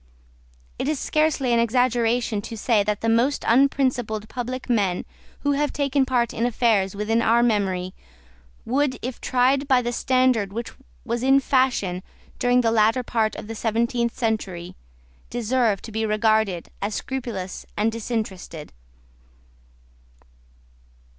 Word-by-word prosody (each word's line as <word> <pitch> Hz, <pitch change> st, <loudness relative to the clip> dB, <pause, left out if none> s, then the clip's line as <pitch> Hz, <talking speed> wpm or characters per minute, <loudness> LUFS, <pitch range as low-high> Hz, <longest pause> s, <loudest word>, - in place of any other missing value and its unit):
It -, -, -1 dB
is 305 Hz, -2 st, 0 dB
scarcely 305 Hz, -5 st, +1 dB
an 235 Hz, -, +3 dB
exaggeration 235 Hz, -2 st, +1 dB
to 225 Hz, +1 st, -7 dB
say 215 Hz, -2 st, +2 dB
that 210 Hz, 0 st, -2 dB
the 225 Hz, -, -1 dB
most 235 Hz, +5 st, +2 dB
unprincipled 245 Hz, -4 st, +2 dB
public 255 Hz, +1 st, -5 dB
men 200 Hz, -7 st, 0 dB, 0.4 s
who 285 Hz, -, +1 dB
have 290 Hz, +1 st, 0 dB
taken 280 Hz, -2 st, +1 dB
part 245 Hz, -3 st, +1 dB
in 230 Hz, -, -2 dB
affairs 220 Hz, -5 st, +1 dB
within 220 Hz, +3 st, 0 dB
our 235 Hz, +1 st, +3 dB
memory 190 Hz, -5 st, 0 dB, 0.7 s
would, 260 Hz, +1 st, 0 dB
if 255 Hz, 0 st, -5 dB
tried 265 Hz, +3 st, +2 dB
by 255 Hz, -3 st, +3 dB
the 240 Hz, 0 st, -2 dB
standard 255 Hz, -6 st, +2 dB
which 235 Hz, +2 st, -4 dB, 0.3 s
was 235 Hz, 0 st, -2 dB
in 270 Hz, +2 st, +5 dB
fashion 255 Hz, -10 st, +1 dB, 0.4 s
during 245 Hz, 0 st, +3 dB
the 230 Hz, -2 st, +2 dB
latter 225 Hz, +3 st, +3 dB
part 220 Hz, -3 st, 0 dB
of -, -, -7 dB
the 225 Hz, -, -6 dB
seventeenth 235 Hz, +2 st, -1 dB
century, 200 Hz, -7 st, -2 dB, 0.5 s
deserve 235 Hz, -3 st, 0 dB
to 225 Hz, -, -8 dB
be 220 Hz, +1 st, -2 dB
regarded 215 Hz, -4 st, +1 dB
as 205 Hz, +2 st, -2 dB
scrupulous 235 Hz, -9 st, -5 dB
and 215 Hz, +2 st, +2 dB
disinterested. 210 Hz, -8 st, -5 dB
235 Hz, 135 wpm, -23 LUFS, 215-255 Hz, 0.7 s, in